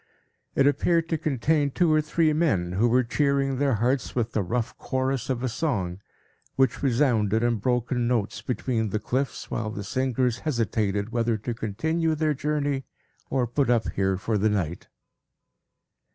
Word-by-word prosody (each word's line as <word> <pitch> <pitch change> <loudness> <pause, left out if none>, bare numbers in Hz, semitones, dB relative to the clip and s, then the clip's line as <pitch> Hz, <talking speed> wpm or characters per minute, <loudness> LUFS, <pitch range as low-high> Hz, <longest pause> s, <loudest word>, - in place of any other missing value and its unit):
It 135 - +4
appeared 165 +4 +2
to 160 - +1
contain 145 +1 +1
two 165 +3 +2
or 155 - +4
three 155 +1 +1
men, 110 - +1
who 100 +6 +2
were 125 +2 +4
cheering 135 +1 +1
their 140 -4 +2
hearts 120 +3 0
with 120 -2 0
the 110 - 0
rough 115 +5 -2
chorus 130 -1 -1
of 130 -1 -1
a - - +1
song, 100 - -2 0.5
which 130 -3 +2
resounded, 115 -5 +2
in 120 -1 +2
broken 125 +2 0
notes, 115 -4 -1
between 120 -3 -1
the 105 - -1
cliffs, 125 +4 -3
while 110 -2 -2
the 105 -1 -5
singers 125 +1 0
hesitated 110 -6 -1
whether 115 -1 +1
to 115 +3 -4
continue 160 +10 -1
their 155 0 +1
journey, 145 -1 -1 0.5
or 130 -2 +1
put 125 +2 0
up 120 -2 +2
here 95 -1 0
for 105 +2 -1
the 110 +2 +3
night. 90 -5 -2
125 Hz, 165 wpm, -26 LUFS, 110-140 Hz, 0.5 s, It